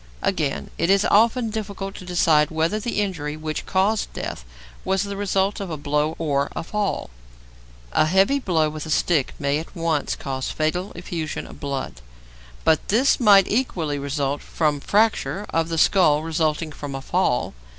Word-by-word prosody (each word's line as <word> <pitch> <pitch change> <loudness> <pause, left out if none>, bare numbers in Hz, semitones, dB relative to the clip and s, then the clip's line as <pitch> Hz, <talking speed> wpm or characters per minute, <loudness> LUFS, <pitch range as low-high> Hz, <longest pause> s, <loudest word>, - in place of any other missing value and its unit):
Again, 70 - -1
it 170 - +1
is 195 +1 +4
often 230 +2 +3
difficult 200 -3 -5
to 185 - -10
decide 160 -4 +3
whether 165 +6 0
the 215 0 -2
injury 155 -7 -3
which 155 -1 -4
caused 200 +3 +1
death - - -5 0.4
was 190 0 +1
the 200 0 -5
result 195 +1 0
of 195 -2 -5
a 160 - -4
blow 150 +2 0
or 140 -3 0
a - - -3
fall. 205 - -2 0.8
A 155 - +3
heavy 195 - +3
blow 165 - +1
with 155 +1 -6
a - - -7
stick 155 -2 +1
may 140 +1 0
at 165 - -10
once 165 -4 0
cause 130 -1 -4
fatal 175 +5 -1
effusion 170 -2 -4
of - - -12
blood, 135 - -4 0.6
but 160 -2 +2
this 250 +7 +3
might 200 -5 +6
equally 170 - -1
result 140 0 -2
from 150 -3 0
fracture 210 +2 +1
of 165 0 0
the 165 - -2
skull 155 -3 +4
resulting 160 -1 -1
from 145 -2 -7
a 135 - -5
fall. 170 -6 0
165 Hz, 170 wpm, -23 LUFS, 150-195 Hz, 0.8 s, might